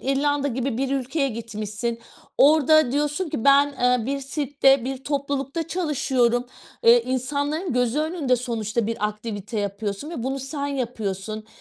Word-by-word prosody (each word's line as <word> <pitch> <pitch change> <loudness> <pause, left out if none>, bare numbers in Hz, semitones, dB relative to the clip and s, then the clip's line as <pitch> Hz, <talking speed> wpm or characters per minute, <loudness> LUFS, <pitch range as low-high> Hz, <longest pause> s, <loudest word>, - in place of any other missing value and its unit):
İrlanda 285 +1 +1
gibi 255 -1 -2
bir 270 0 -1
ülkeye 275 +1 0
gitmişsin, 225 0 -4 0.4
orada 310 -1 +5
diyorsun 295 +5 0
ki: 225 - -4
"Ben, 280 +1 +6
eee, 250 -2 +2
bir 275 +1 -2
sirkte, 275 -2 +2
bir 265 +1 -5
toplulukta 280 +2 -2
çalışıyorum." 260 -8 +1 0.4
Eee, 235 +1 +7
insanların 285 +6 -2
gözü 245 +2 +1
önünde 310 -5 +1
sonuçta 230 -2 -2
bir 225 -2 -1
aktivite 210 0 -5
yapıyorsun 200 - -4
ve 255 - -5
bunu 270 +2 -2
sen 280 +2 -4
yapıyorsun. 215 -6 -4
260 Hz, 140 wpm, -24 LUFS, 230-285 Hz, 0.4 s, Eee